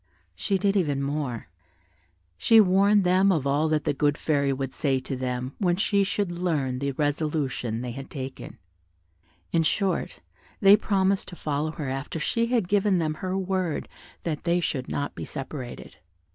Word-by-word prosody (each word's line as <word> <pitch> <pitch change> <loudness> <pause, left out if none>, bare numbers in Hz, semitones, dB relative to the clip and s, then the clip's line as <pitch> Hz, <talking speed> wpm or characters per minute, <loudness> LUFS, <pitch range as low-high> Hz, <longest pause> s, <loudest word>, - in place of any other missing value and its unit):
She 145 - -1
did 200 +1 +1
even 145 -8 +1
more, 140 -5 -3 0.9
she 225 - +5
warned 200 +1 +5
them 185 +2 +4
of 155 -7 0
all 145 +3 +2
that 155 -1 +1
the 150 - 0
good 145 +1 +1
fairy 140 -3 +1
would 135 0 -3
say 135 -3 +1
to 130 +1 -5
them 125 0 -3
when 180 -3 +2
she 200 +1 +2
should 200 -1 -1
learn 155 -8 -1
the 140 0 -2
resolution 145 -5 -1
they 125 -1 -4
had 135 +3 -8
taken: 130 -1 -7 0.9
in 165 - +3
short, 190 +4 0 0.4
they 200 -1 +8
promised 195 -2 +1
to 175 - -9
follow 150 -1 -2
her 150 -4 -5
after 135 +4 -4
she 230 +8 0
had 240 -2 +2
again 175 - -12
given 205 -1 +3
them 155 -2 0
her 185 +4 -3
word 185 -4 -1 0.4
that 155 -3 -3
they 170 +1 +2
should 135 -6 -2
not 145 - -2
be - - -6
separated. 135 -2 -7
155 Hz, 175 wpm, -26 LUFS, 135-190 Hz, 0.9 s, they